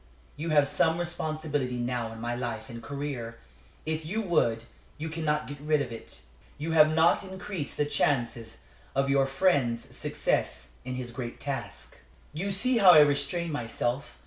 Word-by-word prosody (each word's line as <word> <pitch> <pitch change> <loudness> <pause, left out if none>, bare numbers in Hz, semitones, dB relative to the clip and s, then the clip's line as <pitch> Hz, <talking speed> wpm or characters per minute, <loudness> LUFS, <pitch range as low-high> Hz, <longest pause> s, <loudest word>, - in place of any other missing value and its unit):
You 160 +3 -4
have 145 -2 +4
some 160 +3 +2
responsibility 155 -6 -2
now 120 -1 -2
in 115 - -9
my 120 +1 -2
life 125 +2 -4
and 115 0 -8
career; 125 -3 -5 0.5
if 160 0 -2
you 210 +8 -2
would, 120 - +1 0.3
you 160 +1 -4
cannot 155 -2 -1
get 145 -1 -7
rid 150 0 +2
of 140 -4 -3
it. 115 - -9 0.4
You 155 +3 -3
have 155 -1 +6
not 160 +5 +4
increased 190 -4 -5
the 150 - +2
chances 120 -6 -1 0.3
of 135 0 +2
your 135 -1 +3
friend's 135 -5 +1
success 65 -1 -1
in 130 0 -4
his 125 -1 -5
great 120 -1 -6
task. 135 -9 -6 0.4
"You 180 +7 -2
see 240 +5 +2
how 185 -4 +9
I 155 - +9
restrain 145 +4 +1
myself. 120 0 -3
145 Hz, 165 wpm, -28 LUFS, 120-160 Hz, 0.5 s, how